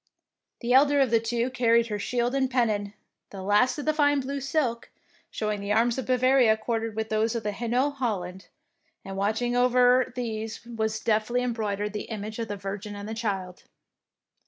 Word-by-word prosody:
The 240 0 0
elder 285 +2 +5
of 265 -4 +3
the 230 - +5
two 235 +2 -1
carried 235 -2 +3
her 210 -1 -3
shield 245 +3 -1
and 270 -1 +1
pennon, 215 -5 0 0.3
the 195 -2 -8
last 205 +8 +3
of 305 +1 -1
fine 290 -1 +3
blue 275 +1 -3
silk, 265 -4 -1 0.4
showing 210 -2 -3
the 200 +1 -1
arms 230 +3 +2
of 260 - -5
Bavaria 255 -3 +4
quartered 225 0 -3
with 220 0 -3
those 220 +2 0
of 225 -2 -3
Hainault 240 +6 0
Holland, 190 -6 -3 0.6
and 195 0 -6
watching 220 +5 0
over 250 0 +4
these 225 -2 -4
was 220 -2 -2
deftly 225 +3 +1
embroidered 210 -4 -2
the 210 - -4
image 215 0 -5
of 230 - -2
the 205 -1 -4
Virgin 200 +2 -6
and 205 +2 -6
Child. 195 -5 -4
230 Hz, 170 wpm, -26 LUFS, 210-250 Hz, 0.6 s, elder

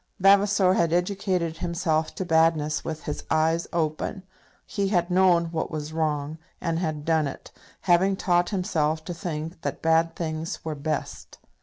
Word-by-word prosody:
Vavasor 195 0 +5
had 170 -3 +2
educated 180 -2 0
himself 165 -2 -1
to 190 - -3
badness 160 -2 +2
with 155 -1 -5
his 150 - -4
eyes 160 +1 +2
open. 165 +4 -2 0.4
He 200 -1 -1
had 180 -3 +1
known 175 -2 +4
what 160 -1 -2
was 155 0 -5
wrong, 155 -1 -1 0.2
and 165 0 -1
had 155 -4 -3
done 160 -2 +2
it, 140 - -9 0.3
having 190 +2 +3
taught 175 -2 +1
himself 160 -5 -1
to 175 - -4
think 165 -2 -5
that - - -4
bad 165 0 +3
things 160 -1 -4
were 160 - -2
best. 150 +1 -4
165 Hz, 155 wpm, -25 LUFS, 155-180 Hz, 0.4 s, Vavasor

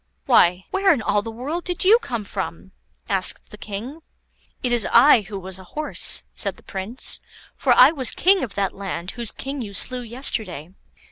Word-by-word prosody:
"Why, 180 +2 +4
where 385 0 +3
in 265 -9 0
all 205 0 +1
the 225 - -7
world 275 +10 -5
did 355 -2 -3
you 440 +5 +6
come 235 - -4
from?" 190 -2 -6 0.4
asked 190 -2 0
the 210 - -11
King. 225 +11 -7 0.6
"It 250 - 0
was 240 -3 +1
I 245 -1 +6
who 205 0 -8
was 190 0 -5
a - - -11
horse," 305 0 +1
said - - -1
the - - -18
Prince; 195 +6 -1 0.4
"for 260 - 0
I 255 +4 +7
was 270 -6 0
king 385 0 +3
of 225 -6 -6
that 195 -1 -1
land 190 -2 -5
whose 235 -3 -3
king 275 +1 -6
you 205 -4 -7
slew 250 +6 0
yesterday. 220 - -3
230 Hz, 190 wpm, -22 LUFS, 195-270 Hz, 0.6 s, I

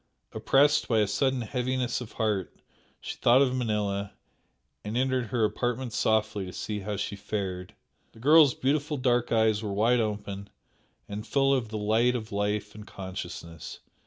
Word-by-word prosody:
Oppressed 145 +2 +3
by 115 - +2
a 105 - +4
sudden 130 +5 0
heaviness 125 +1 -1
of 120 - -9
heart 105 -4 -2 0.4
she - - -6
thought 125 +3 +5
of 130 -1 0
Manella, 105 -5 -1 0.7
and 105 +3 -3
entered 130 -2 +1
her 115 0 +1
apartment 120 +2 -2
softly 110 -3 +1
to 90 - -8
see 105 0 -4
how 105 +1 -4
she 100 - -3
fared. 95 -3 -4 0.4
The - - -16
girl's 150 +1 +6
beautiful 145 +2 0
dark 125 -2 +1
eyes 110 -2 +3
were 105 -2 -4
wide 115 +5 +3
open 100 -2 -3 0.6
and 105 +2 -6
full 135 -1 +3
of 125 -5 0
the 110 - -4
light 110 +4 +2
of 110 -2 -5
life 105 +1 -1
and 105 -1 -11
consciousness. 90 -4 -7
110 Hz, 160 wpm, -28 LUFS, 105-125 Hz, 0.7 s, girl's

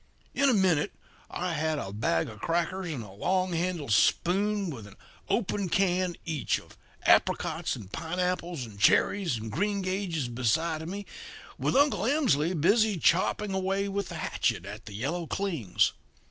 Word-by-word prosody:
In 280 0 +3
a - - +4
minute 180 -7 +2 0.4
I 180 -1 -2
had 155 0 0
a 95 -8 -5
bag 85 -6 0
of 110 -2 -10
crackers 175 - -1
and 130 -7 -4
a 105 - -11
long 185 - 0
handled 170 -6 -2
spoon, 195 - +2
with 115 -7 -8
an 100 - -14 0.3
open 200 -4 0
can 180 -1 +1
each 155 -4 0
of - - -17 0.3
apricots - - +2
and 100 -1 -10
pineapples 175 -2 -2
and 105 -3 -12
cherries 170 - +3
and 110 0 -6
greengages 185 - -1
beside 155 +7 0
of 160 - -6
me 200 +2 -5 0.5
with - - 0
Uncle 265 -8 +3
Emsley 185 - +2
busy 210 +4 +3
chopping 190 +5 +2
away 190 +1 0
with 200 -1 -3
the - - -6
hatchet 85 - -1
at 105 +2 -9
the 105 - -8
yellow 155 - -3
clings. 160 - 0
175 Hz, 160 wpm, -28 LUFS, 135-195 Hz, 0.5 s, a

